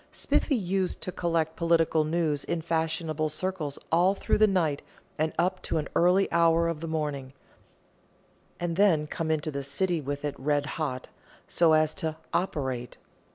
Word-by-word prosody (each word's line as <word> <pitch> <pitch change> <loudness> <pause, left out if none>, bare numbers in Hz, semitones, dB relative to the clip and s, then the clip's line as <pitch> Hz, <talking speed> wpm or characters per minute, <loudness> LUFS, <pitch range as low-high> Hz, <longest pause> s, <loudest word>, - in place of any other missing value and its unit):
Spiffy 285 - +1
used 190 -3 -1
to 185 - -4
collect 165 -2 -1
political 165 -2 +2
news 155 -3 0
in 170 -1 -2
fashionable 160 -1 -1
circles 155 -3 -3
all 180 +4 +4
through - - 0
the 215 - +6
night 165 -7 +1 0.4
and 155 0 +1
up 185 +2 +1
to - - -2
an 150 - -2
early 180 +3 +4
hour 170 0 +4
of 165 -2 -2
the 165 - -5
morning, 145 -4 -3 1.3
and 175 -1 -2
then 180 -7 +4
come 160 +1 -4
into 155 0 0
the 140 -1 -3
City 160 +5 -1
with 145 +1 -4
it 145 - -1
red 145 +1 +1
hot, 140 -4 -4 0.4
so 170 -2 +3
as 155 0 +3
to 160 -4 -3 0.2
"operate." 130 -9 -2
160 Hz, 160 wpm, -28 LUFS, 150-175 Hz, 1.3 s, the